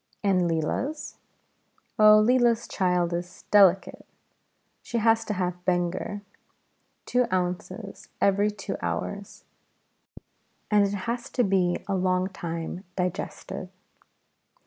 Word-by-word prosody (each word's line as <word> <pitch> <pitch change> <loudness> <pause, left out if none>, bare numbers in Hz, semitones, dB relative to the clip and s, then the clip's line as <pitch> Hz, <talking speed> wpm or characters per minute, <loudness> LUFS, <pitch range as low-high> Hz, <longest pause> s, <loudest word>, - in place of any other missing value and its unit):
"And 185 -3 +2
Leela's?" 255 - -2 0.8
"Oh, 215 0 +8
Leela's 240 -1 +3
child 180 -2 0
is 175 +1 -6
delicate. 195 -2 +4 0.8
She 240 - -4
has 225 0 +3
to 210 - -2
have 180 -1 -3
Benger. 180 +3 -1 0.8
Two 250 -1 +1
ounces 185 +3 -3
every 200 +1 +3
two 195 -1 -5
hours; 200 0 -4 1.3
and 205 -1 +5
it 200 - -3
has 235 +1 -3
to 245 - +1
be 185 -3 +1
a 200 - -1
long 185 0 +1
time 170 0 -5
digested." 180 -1 -4
195 Hz, 105 wpm, -26 LUFS, 180-210 Hz, 1.3 s, Oh